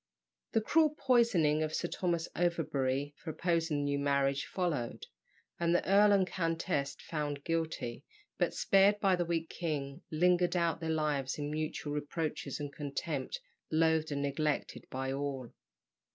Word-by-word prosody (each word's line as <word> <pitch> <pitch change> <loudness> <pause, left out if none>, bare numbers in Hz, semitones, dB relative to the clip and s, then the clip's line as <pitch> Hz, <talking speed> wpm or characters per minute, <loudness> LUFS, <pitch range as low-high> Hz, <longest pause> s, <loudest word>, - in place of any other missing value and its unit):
The 225 - +3
cruel 305 +5 +3
poisoning 220 - +3
of 155 0 -1
Sir 175 - -1
Thomas 170 -2 -1
Overbury 145 -5 0
for - - -8
opposing 165 -1 0
the 145 - 0
new 140 0 0
marriage 140 -1 +1
followed; 155 -11 -2 0.5
and 170 0 +2
the - - +1
earl 205 +2 +6
and 195 -2 +4
countess, 165 -5 -1
found 145 -3 -3
guilty, 160 -8 -2 0.4
but - - +1
spared 200 +1 +4
by 195 -2 +4
the 175 -1 -1
weak 165 -1 -1
king, 145 -5 -3
lingered 175 +2 +3
out 170 -3 +1
their 165 -1 -3
lives 150 -4 0
in 145 0 -3
mutual 155 -1 -3
reproaches 150 -1 -3
and 145 -1 -5
contempt, 140 -1 -3 0.3
loathed 160 -1 +2
and 140 0 -1
neglected 145 +1 -1
by 130 +1 -3
all. 135 -3 -3
155 Hz, 150 wpm, -32 LUFS, 145-175 Hz, 0.5 s, earl